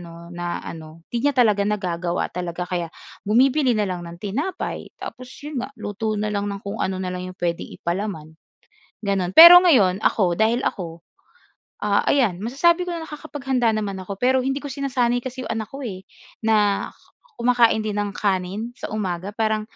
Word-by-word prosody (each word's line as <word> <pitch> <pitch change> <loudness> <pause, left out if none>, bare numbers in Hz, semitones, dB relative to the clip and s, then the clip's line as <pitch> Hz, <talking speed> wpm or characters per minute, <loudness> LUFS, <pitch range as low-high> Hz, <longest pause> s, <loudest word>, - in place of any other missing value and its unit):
'no 170 -1 -11 0.2
na 175 0 -5 0.2
ano, 160 0 -10
'di 235 - -1
niya 280 - -2
talaga 215 -5 +4
nagagawa 180 -4 -2
talaga 180 0 -4
kaya 175 -2 -3 0.4
bumibili 255 +2 +3
na 210 - +1
lang 180 -1 -3
ng 170 0 -9
tinapay, 280 - -4
tapos 255 0 -8 0.2
'yon 295 -4 -4
nga - - -5
luto 215 0 -3
na 210 0 -2
lang 205 0 -1
ng 200 0 -6
kung 200 - -5
ano 190 0 -1
na 185 -1 -3
lang 180 0 -5
'yong 185 - -14
puwedeng 170 -1 -2
ipalaman. 170 -3 -4 0.7
Gano'n. 195 -3 -1
Pero 345 - +11
ngayon 210 - +4
ako 180 -5 +2
dahil 225 +4 +2
ako, 170 -3 -6 0.8
ah, - - +1
ayan 235 -11 +2
masasabi 335 - +2
ko 350 - -3
na 335 - -5
nakakapaghanda 275 -6 -2
naman 200 -3 -3
ako 185 +2 -6
pero 255 +5 +2
hindi 270 +2 -2
ko 285 - -6
sinasanay 250 -3 0
kasi 255 +1 -6
'yong - - -6
anak 220 -1 -3
ko 275 +1 -8
eh, 190 -5 -7 0.4
na 210 -2 +2 0.5
kumakain 235 -2 +3
din 210 - -2
ng 205 0 -1
kanin 200 +4 -2
sa - - -7
umaga. 190 -3 -3
Parang 215 0 0
210 Hz, 180 wpm, -22 LUFS, 185-250 Hz, 0.8 s, Pero